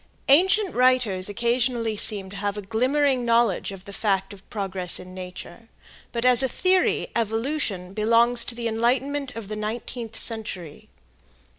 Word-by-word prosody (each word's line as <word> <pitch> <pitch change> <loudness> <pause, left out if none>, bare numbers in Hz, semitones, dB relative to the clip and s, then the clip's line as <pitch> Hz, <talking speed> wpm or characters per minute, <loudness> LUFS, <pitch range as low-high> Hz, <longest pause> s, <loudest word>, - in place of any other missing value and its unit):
Ancient 380 +7 +4
writers 245 -7 +2
occasionally 235 0 -1
seemed 200 -2 +4
to 200 - -9
have 205 0 -3
a 210 - -5
glimmering 255 +5 +1
knowledge 230 -5 +1
of 195 -1 -11
the 200 - -10
fact 195 -2 -1
of 195 -1 -17
progress 190 -4 +1
in 185 0 -11
nature, 185 +4 -10 0.4
but 235 0 -3
as 250 -1 +7
a 265 - +3
theory 370 +6 +1
"evolution" 225 -4 -2
belongs 230 +3 +3
to 235 - -6
the 235 -1 -3
enlightenment 255 +5 -1
of 225 -3 -7
the 215 - -5
nineteenth 225 +1 -5
century. 190 -9 -6
230 Hz, 150 wpm, -24 LUFS, 200-250 Hz, 0.4 s, as